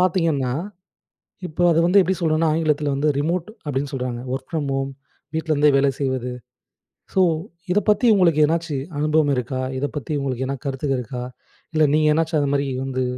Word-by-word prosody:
பார்த்தீங்கன்னா 165 -8 +1 1.0
இப்போ 170 +3 -2
அத 165 - +3
வந்து 185 +3 +5
எப்படி 190 0 +1
சொல்றோன்னா 160 -1 +2
ஆங்கிலத்துல 155 -2 +1
வந்து, 145 +2 +1
"ரிமோட்" 165 +4 0 0.2
அப்படின்னு 140 0 -2
சொல்றாங்க. 125 -2 -3
ஒர்க் 130 0 -5
ஃப்ரம் 155 -4 -1
ஹோம், 135 0 -1 0.4
வீட்லருந்தே 155 -2 +2
வேலை 140 0 +3
செய்வது. 130 -3 -1 0.8
ஸோ, 190 - +3 0.5
இதப்பத்தி 210 +4 +2
உங்களுக்கு 170 -6 +4
எதனாச்சி 160 -1 0 0.2
அனுபவம் 150 -1 +2
இருக்கா? 125 +1 -2 0.2
இதப்பத்தி 145 0 -4
உங்களுக்கு 130 -2 -2
எதனா 135 +1 -2
கருத்துக 135 +1 -2
இருக்கா? 125 +1 -5 0.5
இல்ல 155 -1 +4
நீங்க 155 0 +4
எதனாச்சும் 160 0 +1
அந்தமாரி 140 0 0 0.2
வந்து 130 -1 -1
150 Hz, 150 wpm, -22 LUFS, 135-160 Hz, 1.0 s, வந்து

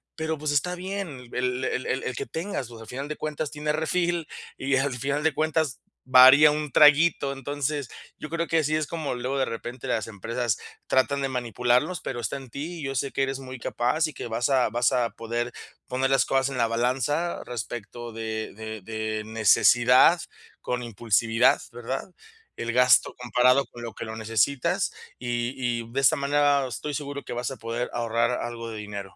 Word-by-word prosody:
Pero, 160 0 -2
pues, 150 0 -2
está 180 +5 +1
bien 180 -9 -6
el 125 +1 -1
el 130 - -2
el 130 - -1
el 130 - -3
que - - -3
tengas, 160 - -4
pues, 115 -1 -11
al 110 - -11
final 135 +5 -5
de 150 - -4
cuentas 155 -1 -3
tiene 150 0 -2
refill, 170 +1 0 0.3
y 135 0 0
al 135 0 0
final 140 +4 -1
de 160 -1 +2
cuentas 155 -2 0 0.2
varía 130 +4 +8
un 150 -1 -3
traguito. 150 0 +5
Entonces, 145 0 -3 0.3
yo 150 - -7
creo 170 0 -2
que 165 - +2
así 155 0 +1
es 155 -1 -2
como 160 -5 -3
luego 125 +3 -2
de 135 - +2
repente 120 +2 -6
las 110 - -1
empresas 115 +2 -2 0.3
tratan 135 +2 +2
de 135 - 0
manipularnos, 125 - 0
pero 120 -2 -4
está 115 +4 -3
en 135 -2 -11
ti. 160 +7 -6
Yo 135 0 -3
sé 135 +2 -1
que 135 - 0
eres 135 0 -2
muy 130 -1 -8
capaz, 125 +7 0
y 155 - -8
que - - -6
vas 115 +1 0
a 130 -4 +3
vas 120 +3 +2
a 120 -2 +2
poder 120 +1 -3 0.4
poner 130 +1 0
las 135 -1 +4
cosas 135 -1 +1
en 135 - -5
la 115 -1 +2
balanza 130 +8 0
respecto 120 0 -6
de 110 -1 -4
de 110 0 -7
de 110 +1 -3
necesidad 120 - +5 0.4
con 125 0 -2
impulsividad, 115 +1 +2
¿verdad? 120 +7 -4 0.5
El 115 0 -3
gasto 125 0 +5
comparado 125 +2 +3
con 120 - -11
lo 115 -2 -6
que - - -7
lo 110 0 -6
necesitas, 115 +4 +1 0.3
y 120 0 -2 0.3
y, 115 - -11
de 135 - +1
esta 155 +4 +5
manera 140 -1 +2
estoy 145 +4 -5
seguro 140 -1 -5
que - - -9
vas 120 +2 -3
a - - -5
poder 115 +1 -3
ahorrar 115 0 +1
algo 115 -1 -5
de 110 - -6
dinero. 100 -2 -7
130 Hz, 195 wpm, -26 LUFS, 120-145 Hz, 0.5 s, varía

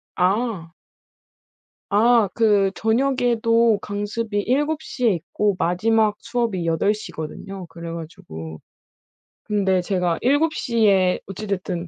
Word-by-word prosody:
아. 185 -3 0 1.2
아 220 0 +4
그 205 -4 +3
저녁에도 230 -2 +2
강습이 205 +1 -3
7 295 +7 0
시에 245 -7 0
있고 185 +4 -1
마지막 215 +5 +2
수업이 230 -7 -2
8 165 +6 +2
시거든요. 190 0 -7
그래 170 0 -8
가지고 80 - -8 0.8
근데 190 -3 +1
제가 180 -2 0
'7 290 +5 +2
시에 200 -9 +2
어찌 195 +3 -7
됐든 180 -3 -3
205 Hz, 195 characters per minute, -22 LUFS, 180-230 Hz, 1.2 s, 아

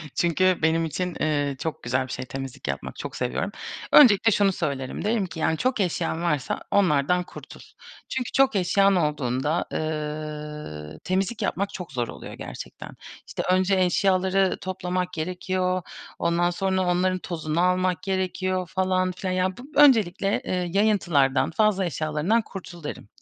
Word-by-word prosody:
Çünkü 180 +2 +2
benim 165 +1 +2
için, 180 +2 -3
ııı, 145 -2 0
çok 160 +1 -4
güzel 130 +2 0
bir - - -9
şey 130 - -4
temizlik 135 0 -7
yapmak. - - -4
Çok - - -6
seviyorum. - - -2 0.4
Öncelikle 225 -5 +7
şunu 200 -1 +3
söylerim. 140 -8 -3
Derim 215 -2 +1
ki, 165 -2 -8
yani, 160 0 +1
çok 255 -2 0
eşyan 170 -3 -1
varsa 150 -6 -1
onlardan 180 -2 +3
kurtul. - - -12 0.5
Çünkü 255 -2 -3
çok 270 -3 +3
eşyan 195 +1 +3
olduğunda, 150 -1 0
ııı, 150 - -5
temizlik 190 +4 -1
yapmak 200 +1 -1
çok 180 -2 -7
zor 120 -2 -2
oluyor - - -9
gerçekten. - - -8 0.4
İşte, - - -4
önce 185 +1 +3
eşyaları 190 +1 +2
toplamak 180 -1 -3
gerekiyor, 185 +2 -1 0.4
ondan 175 +1 +2
sonra 190 +1 0
onların 185 +1 +1
tozunu 165 -2 -2
almak 180 0 +1
gerekiyor 185 -1 -1
falan 185 -1 +1
filan. 185 0 -3
Ya 185 0 0
bu - - -9
öncelikle, 210 -9 +4
ııı, 180 -1 0
yayıntılardan, 170 -10 +2
fazla 200 0 +2
eşyalarından 155 +7 0
kurtul 180 -5 -10
derim. 145 - -6
180 Hz, 145 wpm, -25 LUFS, 155-190 Hz, 0.5 s, Öncelikle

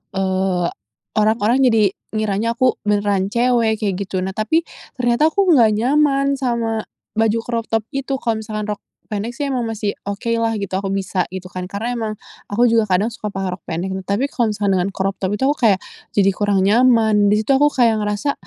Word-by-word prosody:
eee, 190 -2 0 0.5
orang-orang 220 +3 +2
jadi 225 -7 +4 0.2
ngiranya 215 +2 0
aku 255 0 +2
beneran 205 -2 +1
cewek," 235 0 +2
kayak 195 -3 -1
gitu. 185 -1 -2
Nah 190 - -2
tapi 220 - +1 0.3
ternyata 245 +4 +2
aku 395 +5 +2
nggak 230 -8 +5
nyaman 275 +3 +2
sama 230 -4 -1 0.3
baju 225 0 +2
crop 230 -1 -2
top 225 -1 0
itu, 275 0 -2
kalau 230 -4 -1
misalkan 215 -1 -4
rok 205 - -4 0.3
pendek 215 +3 -3
sih 290 - -2
emang 245 -3 -1
masih 215 -2 -2 0.2
oke 200 +3 -3
lah 225 0 0
gitu 200 -3 -4
aku 195 - -4
bisa, 190 -1 -1
gitu 185 -1 -6
kan. 180 0 -5
Karena 215 +6 -3
emang 220 -1 -2 0.3
aku 210 +4 +1
juga 225 -2 +3
kadang 210 +6 0
suka 220 -2 -6
pakai 195 -2 -3
rok - - -62
pendek, 175 +3 -3 0.2
tapi 205 +7 +1
kalau 235 -3 +1
misalkan 205 -1 0
dengan 180 - 0
crop 195 0 -1
top 190 +1 -1
itu 235 - -3
aku 295 - -3
kayak 195 -2 +3 0.4
jadi 195 -1 +4
kurang 200 0 +1
nyaman 220 -1 +4
di 210 +1 +2
situ 245 - 0
aku 285 +2 +5
kayak 230 -6 +2
ngerasa, 210 +7 -1
215 Hz, 195 wpm, -19 LUFS, 200-240 Hz, 0.5 s, nggak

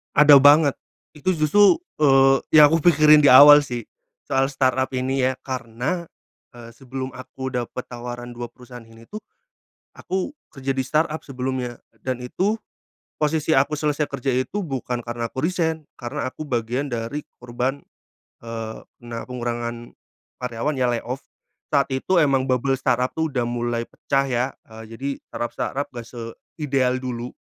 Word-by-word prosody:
Ada 145 -2 +8
banget, 145 +1 +5 0.3
itu 180 +5 -1
justru, 165 - +5 0.2
eee, 135 -2 +5 0.2
yang 150 0 +8
aku 165 - +3
pikirin 155 -2 +7
di 145 - +5
awal 145 +3 +10
sih 120 -5 -4 0.4
soal 135 0 +1
startup 130 -1 +1
ini 130 0 0
ya 130 - -1
karena, 130 +7 -4 0.5
eee, 115 -1 -11
sebelum 130 +1 -7
aku 130 +1 -7
dapat 125 0 -4
tawaran 120 0 -7
2 120 0 -6
perusahaan 125 -1 -13
ini 115 0 -16
tuh, 215 - -5 0.7
aku 190 +8 -4 0.2
kerja 135 -1 -3
di 135 - -2
startup 155 +4 0
sebelumnya 130 -2 -4 0.2
dan 130 +3 -2
itu 200 - 0 0.6
posisi 155 0 +1
aku 145 +2 +1
selesai 150 0 0
kerja 135 0 -4
itu 130 +10 0
bukan 130 -7 -3
karena 120 -1 -5
aku 130 - -3
resign, 160 -2 -1
karena 130 +3 -4
aku 155 - -8
bagian 125 +1 -2
dari 115 +6 -4 0.2
korban, 125 +3 -3 0.6
eee, 115 -1 -6 0.2
kena 120 -1 -7
pengurangan 120 -1 -4 0.6
karyawan 125 +5 -2
ya 125 -2 +1
layoff. 125 +3 -4 0.5
Saat 140 -2 +2
itu 175 +7 +1
emang 135 -4 +3
bubble 135 +1 +1
startup 125 -1 0
tuh 160 -2 -1
udah 125 -3 -1
mulai 120 -1 -2
pecah 135 0 -1
ya, 125 +1 0 0.2
eee, 110 0 -11 0.2
jadi 140 +1 -2 0.2
startup-startup 135 +4 -3
gak 120 - -5
seideal 130 +2 -2
dulu, 125 -1 -5
130 Hz, 150 wpm, -22 LUFS, 120-145 Hz, 0.7 s, awal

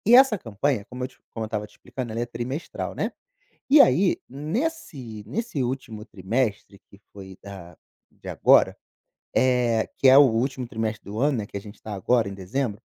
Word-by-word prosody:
e 235 - +7
essa 260 -3 +7
campanha, 115 - -1
como 125 +1 -8
eu - - -3
te - - -25
como 115 -1 -4
eu - - -3
estava 105 -1 -3
te - - -26
explicando, 125 -4 -7
ela 115 - -3
é 120 - -1
trimestral, 120 +6 -5
né, - - -1 0.6
e 290 +1 +8
aí 175 +9 +4
nesse 145 - -4
nesse 190 - -3
último 120 -4 -4
trimestre, 105 0 -2
que 100 - -18
foi 95 -1 -11
da 90 -4 -10 0.3
de - - -15
agora, - - +4 0.6
eh, 125 -3 +2
que 135 - +4
é 135 +2 +9
o - - +10
último 130 0 +1
trimestre 110 -2 -3
do 105 +2 -6
ano, 140 -1 +2
né, 105 - -3
que - - -9
a - - -3
gente 105 +1 -13
tá 110 - -6
agora 110 +3 +2
em 100 - -6
dezembro, 105 +3 -3
120 Hz, 195 wpm, -25 LUFS, 105-135 Hz, 0.6 s, o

